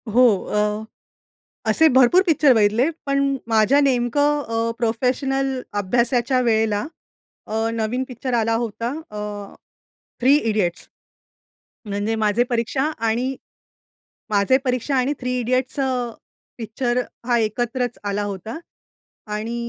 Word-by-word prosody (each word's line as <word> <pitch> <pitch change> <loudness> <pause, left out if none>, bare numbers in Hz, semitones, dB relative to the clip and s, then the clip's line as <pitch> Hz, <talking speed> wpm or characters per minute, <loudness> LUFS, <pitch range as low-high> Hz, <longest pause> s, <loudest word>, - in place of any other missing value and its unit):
हो. 250 - +6 0.3
अ, 210 +1 0 0.9
असे 320 - +4
भरपूर 265 +8 +6
पिक्चर 300 -4 +5
बघितले, 220 +5 +3 0.2
पण 275 0 +1
माझ्या 225 +6 +4
नेमकं 285 +3 +2
अ, 230 0 0
प्रोफेशनल 260 +3 0 0.2
अभ्यासाच्या 240 +5 +1
वेळेला 220 -2 +1 0.6
अ, 220 +1 -1
नवीन 230 +3 -1
पिक्चर 250 0 -4
आला 230 -1 +2
होता 230 +1 -4 0.2
अ, 210 - -7 1.0
थ्री 265 +3 +5
इडियट्स. 210 - -1 1.0
म्हणजे 205 +2 -2
माझे 210 +3 +3
परीक्षा 240 +3 0 0.2
आणि 250 +4 0 0.9
माझे 205 +5 +3
परीक्षा 250 +2 0
आणि 260 +3 +1
थ्री 250 0 -2
इडियट्स 255 +3 -1
अ, 270 - +2 0.7
पिक्चर 240 +2 -1 0.3
हा 240 -1 +3
एकत्रच 240 +2 -1
आला 205 0 -1
होता. 205 - -5 0.7
आणि 215 +3 -4
240 Hz, 115 wpm, -22 LUFS, 220-260 Hz, 1.0 s, हो